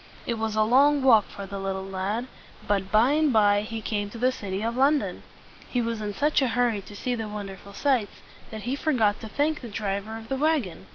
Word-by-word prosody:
It 235 -2 -2
was 220 -1 -2
a 215 - +4
long 275 +5 +4
walk 225 -6 +6
for 200 - -8
the 195 0 -6
little 190 0 -3
lad; 195 +5 -2 0.4
but 195 -2 0
by 225 +5 +5
and 305 -1 +3
by 205 -3 +4
he 220 +1 -5
came 205 -1 -2
to 230 - -9
the 250 +2 +2
city 200 -4 -4
of 230 +1 -1
London. 280 +3 +2 0.5
He 250 - 0
was 230 -2 -2
in 210 -1 -3
such 295 +4 +2
a 265 - +2
hurry 235 -4 +2
to 205 - -12
see 250 +4 -2
the 225 -2 -3
wonderful 200 -1 -8
sights, 255 -4 0 0.3
that 220 -1 -7
he 250 +3 -1
forgot 240 -9 +1
to 220 - -8
thank 295 +6 0
the 240 - -7
driver 205 +1 -3
of 225 0 -10
the 270 - -2
wagon. 285 - 0
220 Hz, 225 wpm, -26 LUFS, 205-255 Hz, 0.5 s, walk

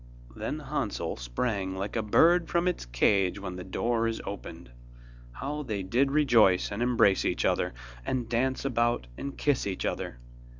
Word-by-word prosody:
Then - - -3
Hansel - - -2
sprang 95 - -2
like 100 +2 -4
a 115 - +1
bird 165 +11 +4
from 175 +1 +1
its 180 - -2
cage 90 - +2
when 95 -2 -6
the 90 - -6
door 115 +5 0
is 115 0 -2
opened. 100 -10 -8 0.6
How 145 - -4
they 105 -8 -3
did 125 +9 +2
rejoice 120 -12 +4
and 100 +3 -3
embrace 115 -5 +3
each - - 0
other, - - +1 0.3
and 125 - -2
dance 130 +3 0
about 120 - +1
and 140 - -6
kiss 145 -7 +1
each 95 - -3
other! - - -3
115 Hz, 165 wpm, -28 LUFS, 95-130 Hz, 0.6 s, bird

